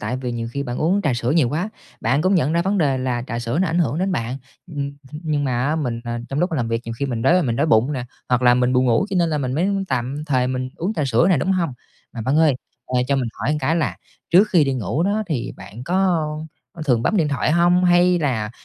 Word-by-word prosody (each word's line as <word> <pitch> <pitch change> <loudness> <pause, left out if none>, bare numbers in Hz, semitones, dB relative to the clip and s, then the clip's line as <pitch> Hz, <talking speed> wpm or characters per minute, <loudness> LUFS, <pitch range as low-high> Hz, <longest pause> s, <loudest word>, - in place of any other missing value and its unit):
tại 125 - -2
vì 125 -2 -4
nhiều 115 -1 -4
khi 140 - -2
bạn 120 -3 -4
uống 185 +6 +1
trà 145 -5 +1
sữa 120 +1 -1
nhiều 150 -6 +3
quá, 165 - -2 0.3
bạn 140 +4 +1
cũng 185 +2 +3
nhận 155 -4 +2
ra 170 +1 +2
vấn 195 +2 0
đề 140 -6 +2
là 125 -2 -1
trà 115 - -3
sữa 120 +5 -2
nó 185 - +2
ảnh 165 - 0
hưởng 155 -3 +1
đến 190 +1 0
bạn, 120 -3 -2 0.3
ừm, 165 -4 -11 0.4
ừm, 150 - -7
nhưng 150 -2 0
mà 125 -2 0
á 155 +2 0
mình, 125 -7 -2
à, 120 0 -3
trong 135 - -3
lúc 175 +2 0
làm 120 -7 -1
việc 115 0 -1
nhiều 115 - -5
khi 140 - -1
mình 120 -3 -3
đói, 180 +6 +4
mình 115 -4 -1
đói 145 - +2
bụng 125 +2 +3
nè, 130 -3 -3 0.2
hoặc 125 0 +2
là 120 0 +6
mình 125 0 +2
buồn 130 0 +3
ngủ 120 - +2
cho 195 - -1
nên 170 - +2
là 150 - 0
mình 130 -3 -2
mới 170 +8 +1 0.2
tạm 130 +3 -2
thời 130 -4 +1
mình 130 0 -2
uống 185 +6 -2
trà 155 - -1
sữa 125 +2 +3
nè, 175 - +4
đúng 185 +8 +1
hông? 170 -6 0 0.4
Mà 115 - -6
bạn 130 +7 0
ơi, 155 -3 +4 0.3
ờ, 125 -1 +1
cho 140 - +2
mình 130 -3 -1
hỏi 145 - -2
một 155 - -1
cái 145 +5 +1
là 165 - -1 0.3
trước 190 +5 +6
khi 170 -5 +5
đi 135 -1 0
ngủ 130 +6 -1
đó 205 +4 +1
thì 150 -9 -3
bạn 100 +5 -10
có, 175 +5 -2
ơ, 160 -5 0 0.3
có 165 - -8
thường 125 -6 +2
bấm 215 - +1
điện 160 -6 +2
thoại 145 +1 0
hông 175 +2 +4
hay 175 0 +4
là 120 -9 -1
140 Hz, 285 wpm, -21 LUFS, 125-170 Hz, 0.4 s, là